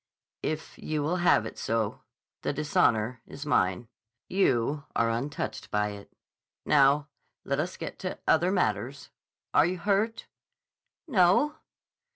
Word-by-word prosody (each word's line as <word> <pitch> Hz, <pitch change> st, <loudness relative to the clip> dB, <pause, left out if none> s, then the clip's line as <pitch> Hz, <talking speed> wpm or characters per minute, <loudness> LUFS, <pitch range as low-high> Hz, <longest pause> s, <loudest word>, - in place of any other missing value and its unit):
"If 155 Hz, 0 st, -4 dB
you 155 Hz, -2 st, -2 dB
will 170 Hz, +5 st, 0 dB
have 175 Hz, -11 st, +4 dB
it -, -, -7 dB
so. 115 Hz, -2 st, -1 dB, 0.4 s
The -, -, -1 dB
dishonor 120 Hz, -5 st, +1 dB
is 140 Hz, +2 st, -8 dB
mine. 95 Hz, -6 st, +1 dB, 0.4 s
You 145 Hz, -6 st, +1 dB
are 115 Hz, 0 st, +2 dB
untouched 135 Hz, +6 st, -4 dB
by 105 Hz, 0 st, +1 dB
it.... 100 Hz, -1 st, -10 dB, 0.5 s
Now, 145 Hz, +1 st, +4 dB, 0.3 s
let 140 Hz, +1 st, -1 dB
us 170 Hz, +4 st, -2 dB
get -, -, -6 dB
to 185 Hz, -, -4 dB
other 175 Hz, +3 st, +4 dB
matters. 135 Hz, -, -1 dB, 0.4 s
Are 150 Hz, -, +5 dB
you 185 Hz, +1 st, -2 dB
hurt?" 205 Hz, +4 st, 0 dB, 0.8 s
"No." 210 Hz, -, +4 dB
145 Hz, 130 wpm, -28 LUFS, 115-175 Hz, 0.8 s, Are